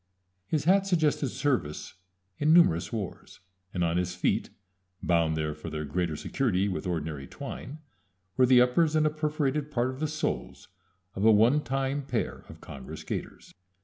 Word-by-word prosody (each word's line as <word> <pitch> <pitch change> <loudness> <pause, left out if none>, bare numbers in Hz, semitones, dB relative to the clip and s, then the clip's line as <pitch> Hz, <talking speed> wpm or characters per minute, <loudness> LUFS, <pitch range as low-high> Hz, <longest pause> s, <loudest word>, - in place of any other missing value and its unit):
His 150 +6 0
hat 195 +4 +4
suggested 155 -6 +2
service 125 - -2 0.5
in 150 +1 +3
numerous 160 - +5
wars, 105 -6 -6 0.3
and 90 - -1
on 85 0 +1
his 90 0 -1
feet, 90 - 0 0.5
bound 85 -2 +2
there 75 -1 -1
for 75 +2 -8
their 75 -1 -4
greater 85 +2 -1
security 100 - 0
with 95 -1 -3
ordinary 80 -5 -3
twine, 140 +4 -7 0.6
were 130 -1 +4
the 125 -1 +7
uppers 150 +6 +3
and 155 0 +3
a 155 - +3
perforated 150 -1 -1
part 125 -3 0
of 130 - -9
the 155 - 0
soles 155 +1 -4 0.4
of 95 - -3
a 110 - +7
one 115 +8 +5
time 135 +2 -1
pair 125 -4 -3
of - - -12
congress 65 -1 -9
gaiters. - - -6
125 Hz, 165 wpm, -28 LUFS, -, 0.6 s, the